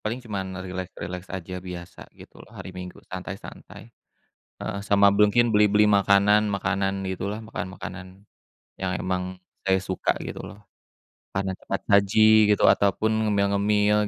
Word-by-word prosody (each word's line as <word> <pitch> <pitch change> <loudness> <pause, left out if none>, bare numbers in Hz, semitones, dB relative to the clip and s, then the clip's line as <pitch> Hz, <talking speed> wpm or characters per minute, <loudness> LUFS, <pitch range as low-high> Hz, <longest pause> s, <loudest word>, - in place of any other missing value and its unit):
paling 120 +4 -4
cuma 105 -4 -3
rileks-rileks 95 -1 -6
aja, 95 -1 -6
biasa 90 -1 -9 0.2
gitu - - -15
loh, - - -14
hari - - -8
Minggu 90 0 -8
santai-santai. 95 +1 -9 0.7
Heeh, 100 - -4
sama 100 0 +5
mungkin 105 +4 +3
beli-beli 105 0 +4
makanan, 100 +1 +4
makanan 95 -1 -1
gitu 95 +1 -4
lah, 105 +2 -4
makanan-makanan 95 -3 -8 0.5
yang 95 -1 -3
emang 90 0 -3 0.2
saya 95 -1 +2
suka 95 0 -1
gitu - - -7
loh. 100 - -10 0.8
Makanan 95 -1 -2
cepat - - -4
saji 100 +1 +4 0.4
gitu, - - -2
ataupun 100 +2 +1 0.2
ngemil-ngemil, 105 +1 +2
100 Hz, 130 wpm, -25 LUFS, 95-105 Hz, 0.8 s, sama